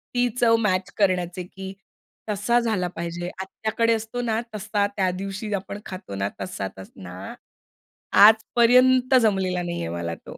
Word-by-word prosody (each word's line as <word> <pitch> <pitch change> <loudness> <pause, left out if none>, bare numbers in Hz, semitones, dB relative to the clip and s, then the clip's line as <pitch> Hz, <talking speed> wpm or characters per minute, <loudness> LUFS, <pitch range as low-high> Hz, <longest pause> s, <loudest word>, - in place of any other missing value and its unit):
ती 245 0 +3
चव 230 -1 +5
मॅच 185 +1 -1
करण्याचे 180 -2 0
की 190 +2 -9 0.6
तसा 210 +4 +2
झाला 215 -6 0
पाहिजे. 170 +1 -4
आत्याकडे 220 +4 0
असतो 225 +2 -4
ना 225 -2 0 0.2
तसा 210 0 0
त्या 190 -2 +1
दिवशी 195 +3 -5
आपण 200 +1 -4
खातो 185 - -7
ना 100 +1 -1
तसा 95 0 -4
तस 95 - -11
ना. 95 +1 -9 0.9
आजपर्यंत 245 +4 +5
जमलेला 190 -4 +1
नाहीये 170 - -4
मला 85 0 -4
तो. - - -12
195 Hz, 145 wpm, -24 LUFS, 175-220 Hz, 0.9 s, चव